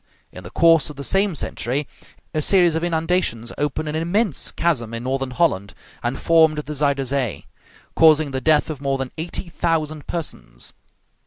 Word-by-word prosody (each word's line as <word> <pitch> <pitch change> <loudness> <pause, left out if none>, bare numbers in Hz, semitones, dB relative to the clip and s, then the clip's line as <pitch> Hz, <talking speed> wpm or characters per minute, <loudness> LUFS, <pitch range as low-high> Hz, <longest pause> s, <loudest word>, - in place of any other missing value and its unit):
In 90 - -10
the 90 - -8
course 165 - +4
of 150 - -9
the 140 - -7
same 195 +2 +2
century, 135 +1 -2 0.5
a 155 - 0
series 175 0 +4
of 160 +1 -1
inundations 165 -8 0
opened 150 +2 -1
an 150 - -3
immense 175 - 0
chasm 120 -10 -1
in 115 - -5
northern 135 +1 -1
Holland, 125 - 0 0.3
and 120 +2 -2
formed 160 -2 +4
the 150 0 -4
Zuyder 140 -2 +1
Zee, 130 -5 -2 0.5
causing 155 -2 +5
the 130 0 -2
death 155 +2 +3
of 145 -3 -7
more 135 -1 0
than 135 -1 -4
eighty 170 +2 -4
thousand 155 -3 -1
persons. - - -5
150 Hz, 170 wpm, -22 LUFS, 130-165 Hz, 0.5 s, causing